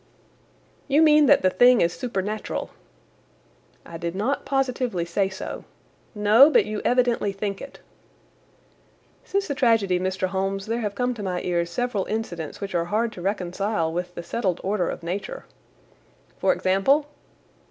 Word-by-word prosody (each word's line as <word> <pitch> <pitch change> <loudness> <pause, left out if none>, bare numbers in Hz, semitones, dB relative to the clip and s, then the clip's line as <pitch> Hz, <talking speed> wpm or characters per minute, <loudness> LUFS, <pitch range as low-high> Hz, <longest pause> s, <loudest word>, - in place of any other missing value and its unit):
"You 285 +1 +3
mean 300 -2 +6
that - - +5
the 185 - +4
thing 245 +5 +5
is 170 +1 +2
supernatural?" 215 -3 -4 1.1
"I 165 - -8
did 170 +1 -4
not 240 +9 -1
positively 255 -9 -1
say 190 +3 0
so." 190 - -7 0.5
"No, 215 +7 +6
but - - +4
you 215 0 -4
evidently 245 -4 +2
think 195 0 -4
it." 275 - -10 1.5
"Since 395 0 -1
the 285 - -1
tragedy, 225 -9 +2
Mr. 185 0 -1
Holmes, 195 +1 -2
there 230 +2 -2
have 205 -2 -3
come 250 +3 0
to 230 - -8
my 185 -3 -2
ears 170 -1 -1
several 225 +1 -2
incidents 175 -8 -4
which 200 -2 -5
are 170 -1 0
hard 220 +5 0
to 180 - -10
reconcile 185 -2 -1
with 175 +1 -4
the 170 - -6
settled 185 0 -2
order 190 -2 0
of - - -6
Nature." 200 - -5 0.9
"For - - +3
example?" 195 +11 +2
200 Hz, 150 wpm, -24 LUFS, 180-245 Hz, 1.5 s, mean